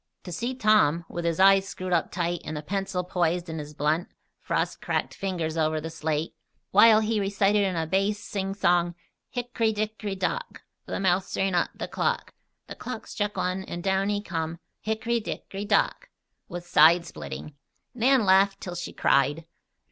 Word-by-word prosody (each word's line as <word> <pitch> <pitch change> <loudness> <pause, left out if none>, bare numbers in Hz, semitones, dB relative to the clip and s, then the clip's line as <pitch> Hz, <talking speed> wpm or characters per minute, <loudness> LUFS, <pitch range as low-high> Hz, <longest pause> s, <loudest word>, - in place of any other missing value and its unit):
To 180 - -8
see 240 +8 -3
Tom, 210 - +3
with 175 0 -5
his 165 0 0
eyes 195 0 +6
screwed 185 -2 -4
up 170 - +1
tight 175 -1 -1
and 155 0 -5
the 150 - -5
pencil 195 +1 -2
poised 175 -1 0
in 160 0 -4
his 150 0 -8
blunt, 155 +5 0 0.3
frost - - -2
cracked - - -1
fingers 170 -5 -3
over 155 -1 +1
the 160 +1 -6
slate, 155 0 -2 0.4
while 215 +2 +7
he 220 0 0
recited 200 +1 +2
in 190 -2 0
a 165 -1 0
base 195 +5 +1
sing 195 -2 -4
song: 175 -3 +2 0.3
"Hick'ry, 240 -2 -1
dick'ry, 215 -1 -3
dock 485 - -3 0.2
The - - -3
mouse 185 -1 +1
ran 195 -1 +1
up 175 - +2
the - - -5
clock, - - -1 0.3
The - - -8
clock 235 -3 -7
struck 205 -1 -3
one, 185 +1 -1
An' 175 - -5
down 195 +1 +1
he 205 0 -1
come 165 -3 -3 0.3
Hick'ry, 225 +2 0
dick'ry, 200 -1 -5
dock," 220 - +1 0.4
was 175 0 -7
side 170 +2 +6
splitting. 150 - -8 0.4
Nan 250 -1 +3
laughed 195 +1 +4
till 180 - -6
she 175 - -5
cried. 145 +4 +2
190 Hz, 175 wpm, -26 LUFS, 170-205 Hz, 0.4 s, while